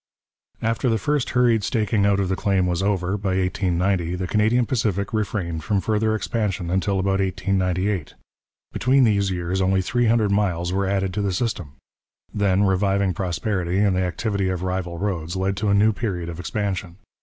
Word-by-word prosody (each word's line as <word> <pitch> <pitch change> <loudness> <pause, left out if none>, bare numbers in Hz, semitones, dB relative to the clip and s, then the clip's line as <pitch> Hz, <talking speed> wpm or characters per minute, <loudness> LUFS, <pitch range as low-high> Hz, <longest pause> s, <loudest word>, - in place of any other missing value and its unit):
After 115 +3 +1
the 115 - +2
first 145 0 0
hurried 120 -4 +3
staking 105 -2 +1
out 100 -1 +2
of 95 - 0
the 95 - 0
claim 95 -2 +1
was 90 0 0
over, 95 -1 0
by 95 -1 -1
1890, 90 -1 0
the 90 0 -3
Canadian 110 +6 +2
Pacific 105 -6 -1
refrained 95 -6 -2
from 105 0 +1
further 110 +2 0
expansion 105 -6 -2
until 95 +1 0
about 95 +1 +1
1898: 95 -1 -1 0.6
between 130 +2 +3
these 100 -4 +2
years 90 +1 -2
only 95 0 +2
three 120 +5 +1
hundred 110 -2 +2
miles 90 -4 0
were 100 0 0
added 95 -1 0
to 105 - -1
the 100 -1 0
system. 90 - -3 0.6
Then 100 -1 +2
reviving 95 0 +1
prosperity 90 0 -2
and 100 -2 +3
the 90 - +1
activity 95 +2 -1
of 90 -1 -3
rival 90 -2 -3
roads 85 -3 -3
led 95 +1 0
to 105 +4 0
a 100 - +4
new 110 +2 +4
period 90 -6 -3
of 85 0 -7
expansion. 95 -1 -3
95 Hz, 180 wpm, -23 LUFS, 90-105 Hz, 0.6 s, a